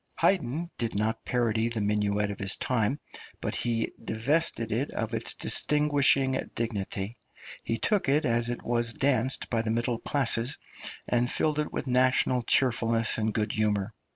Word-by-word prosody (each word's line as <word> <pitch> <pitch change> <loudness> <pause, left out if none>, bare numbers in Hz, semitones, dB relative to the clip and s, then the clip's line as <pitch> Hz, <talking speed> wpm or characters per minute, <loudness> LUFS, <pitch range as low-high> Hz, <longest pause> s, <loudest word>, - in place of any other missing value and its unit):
Haydn 170 -1 0
did 115 -3 -2
not 110 +2 -1
parody 115 -2 +1
the 115 -1 -3
minuet 105 0 0
of 100 - -8
his 95 0 +2
time, 125 +3 0 0.4
but - - -3
he 115 -2 -1
divested 115 0 0
it 125 +7 -1
of 115 +1 -4
its 115 0 +1
distinguishing 145 -2 +3 0.2
dignity; 105 -1 -3 0.5
he 115 - -2
took 195 - +1
it 145 +3 +2
as 120 0 +1
it 120 - -4
was 120 -1 0
danced 130 -1 +1
by 115 -2 +1
the 110 - -3
middle 115 +1 0
classes, 130 -2 0 0.5
and 120 0 +1
filled 150 -1 +1
it 150 - -2
with - - -4
national 130 0 +2
cheerfulness 115 -2 +2
and 110 0 0
good 105 -1 0
humour. 105 -1 0
115 Hz, 155 wpm, -28 LUFS, 110-130 Hz, 0.5 s, distinguishing